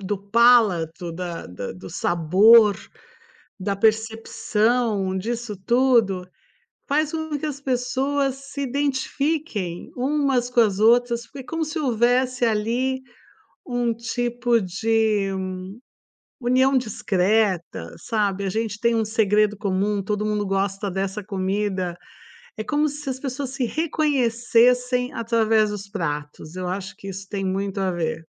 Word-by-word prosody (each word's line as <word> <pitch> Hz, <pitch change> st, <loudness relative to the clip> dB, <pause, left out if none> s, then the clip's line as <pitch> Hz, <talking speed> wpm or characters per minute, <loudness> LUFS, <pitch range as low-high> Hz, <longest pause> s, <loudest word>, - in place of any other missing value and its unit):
do 200 Hz, +1 st, -3 dB
palato, 200 Hz, -6 st, +3 dB
da 175 Hz, -1 st, -5 dB
da 90 Hz, +2 st, -6 dB
do 95 Hz, 0 st, -10 dB
sabor, 200 Hz, -, +5 dB, 0.8 s
da 200 Hz, +1 st, -1 dB
percepção 220 Hz, -1 st, +1 dB
disso 230 Hz, +2 st, -4 dB
tudo, 235 Hz, -7 st, +3 dB, 0.6 s
faz 300 Hz, +1 st, +1 dB
com 315 Hz, -2 st, -3 dB
que 310 Hz, -, -4 dB
as 280 Hz, -2 st, -5 dB
pessoas 265 Hz, +1 st, 0 dB
se 280 Hz, 0 st, -5 dB
identifiquem 275 Hz, -, -2 dB
umas 265 Hz, -2 st, +1 dB
com 245 Hz, -, +1 dB
as 205 Hz, -3 st, +1 dB
outras, 235 Hz, +1 st, +3 dB
foi 270 Hz, +1 st, -9 dB
como 325 Hz, +4 st, -3 dB
se 315 Hz, +1 st, -4 dB
houvesse, 250 Hz, 0 st, +1 dB
ali, 240 Hz, +5 st, 0 dB, 0.7 s
um 245 Hz, -2 st, 0 dB
tipo 240 Hz, +1 st, 0 dB
de 210 Hz, +1 st, +1 dB, 1.1 s
união 260 Hz, +2 st, +3 dB
discreta, 195 Hz, -, 0 dB
sabe, 200 Hz, -3 st, -1 dB
a -, -, 0 dB
gente 215 Hz, +1 st, -3 dB
tem 235 Hz, -1 st, +2 dB
um 225 Hz, -, +1 dB
segredo 210 Hz, -1 st, +2 dB
comum, 200 Hz, 0 st, 0 dB
todo 210 Hz, +2 st, -2 dB
mundo 210 Hz, -1 st, -1 dB
gosta 195 Hz, 0 st, -1 dB
dessa 195 Hz, +2 st, -3 dB
comida. 190 Hz, -2 st, -2 dB, 0.6 s
É 215 Hz, -, -3 dB
como 295 Hz, +6 st, +1 dB
se 295 Hz, 0 st, -7 dB
as 260 Hz, -1 st, -3 dB
pessoas 270 Hz, 0 st, -4 dB
se 265 Hz, -1 st, -2 dB
reconhecessem 250 Hz, -4 st, +2 dB
através 225 Hz, -2 st, +2 dB
dos 200 Hz, -1 st, -6 dB
pratos, 150 Hz, -1 st, -5 dB
eu 185 Hz, -1 st, -4 dB
acho 185 Hz, +1 st, -4 dB
que 195 Hz, -, -9 dB
isso 195 Hz, +1 st, -7 dB
tem 195 Hz, -2 st, -3 dB
muito 195 Hz, +1 st, -2 dB
a 190 Hz, -1 st, +1 dB
ver. 165 Hz, -2 st, -3 dB
220 Hz, 130 wpm, -23 LUFS, 195-250 Hz, 1.1 s, sabor